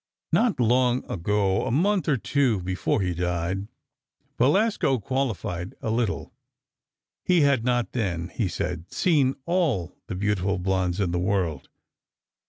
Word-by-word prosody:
Not 230 - +2
long 125 +1 +2
ago—a 100 +1 0
month 185 - +1
or 140 - +3
two 125 -3 +1
before 95 +3 0
he 90 -2 0
died—Belasco 100 - -1
qualified—a 110 -6 -3
little: 115 -2 -1 0.9
He 180 -2 +3
had 140 -5 +3
not 120 -1 0
then, 90 -8 -2
he 110 -1 -1
said, 85 0 -4
seen 145 -7 +2
all 155 - 0
the - - -4
beautiful 100 0 0
blondes 95 0 0
in 95 -4 0
the 90 - 0
world. 90 -6 -1
105 Hz, 120 wpm, -25 LUFS, 90-130 Hz, 0.9 s, or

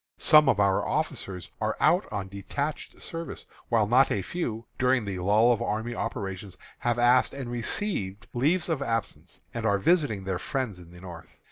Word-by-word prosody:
Some 150 -2 +6
of 105 - +2
our 100 -1 +3
officers 90 -4 -3
are - - -1
out - - +3
on 95 -2 -3
detached 140 +10 -5
service, 165 -3 -6 0.2
while 115 -3 +3
not 125 +5 +4
a 100 - 0
few, 115 - -4
during 125 -2 +2
the 95 -2 -4
lull 105 +6 +4
of 115 - -3
army 115 +1 -2
operations, 95 -4 -5 0.2
have 120 -1 0
asked 120 +2 +4
and 130 -3 -5
received 110 - -2
leaves 155 +8 +2
of 160 -5 -1
absence, 115 -4 -3
and 115 - -4
are 100 -2 +3
visiting 115 - +2
their 95 -2 -2
friends 125 -5 -3
in 85 -1 -13
the 90 0 -14
North. 85 -3 -11
115 Hz, 175 wpm, -27 LUFS, 100-130 Hz, 0.2 s, Some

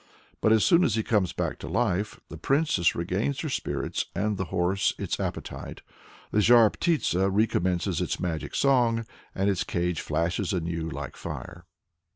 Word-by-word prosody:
But 110 - +3
as 110 -1 +5
soon 175 0 +5
as 115 - +2
he 110 - 0
comes 100 -7 +1
back - - -3
to - - -7
life, 100 +2 -1
the 80 - -9
princess 135 - +2
regains 95 +11 -1
her 155 - -3
spirits, - - -2
and 105 +2 0
the 95 -1 -2
horse 90 +3 0
its - - -3
appetite. - - -5 0.5
The 105 - +2
Zhar 115 -1 +6
Ptitsa 100 - +1
recommences 95 -4 +1
its - - -2
magic 85 -3 -3
song, 120 -4 +3 0.3
and 95 +1 0
its 100 0 +1
cage 90 -4 -1
flashes 90 +4 -1
anew 85 -2 -2
like 70 -3 -6
fire. 85 +1 -8
95 Hz, 165 wpm, -27 LUFS, 85-115 Hz, 0.5 s, Zhar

